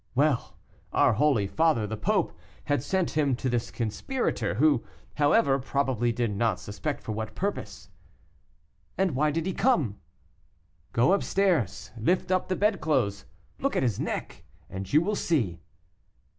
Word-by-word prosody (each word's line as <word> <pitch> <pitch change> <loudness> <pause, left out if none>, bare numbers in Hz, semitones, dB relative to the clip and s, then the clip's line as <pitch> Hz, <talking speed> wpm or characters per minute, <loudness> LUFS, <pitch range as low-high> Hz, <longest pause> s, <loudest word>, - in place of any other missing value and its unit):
"Well, 145 -1 +1 0.3
our - - +4
holy 120 -3 +2
father, 155 0 +2
the 110 +1 -4
Pope, 105 - 0 0.3
had 145 -3 0
sent 185 +5 0
him 145 -4 +1
to 130 - -3
this 120 -2 -1
conspirator, 120 - -2
who, 140 0 +3 0.3
however, 145 -1 +3
probably 130 -3 0
did 115 -1 -1
not 110 -2 +1
suspect 100 -3 -4
for - - -4
what 110 0 -4
purpose." 200 - -4 1.1
"And 190 -2 +2
why 150 +3 +2
did 160 +2 -1
he 190 - -1
come?" 155 - +1 0.9
"Go 120 +9 +3
up 200 - +2
stairs, 135 - 0
lift 175 +12 0
up 185 0 +1
the 185 - 0
bedclothes, 140 - +1 0.3
look 275 - 0
at - - +2
his 120 -6 0
neck, - - -4 0.3
and 95 0 -6
you 155 - +5
will 210 +4 -1
see." 115 - 0
135 Hz, 150 wpm, -27 LUFS, 110-165 Hz, 1.1 s, you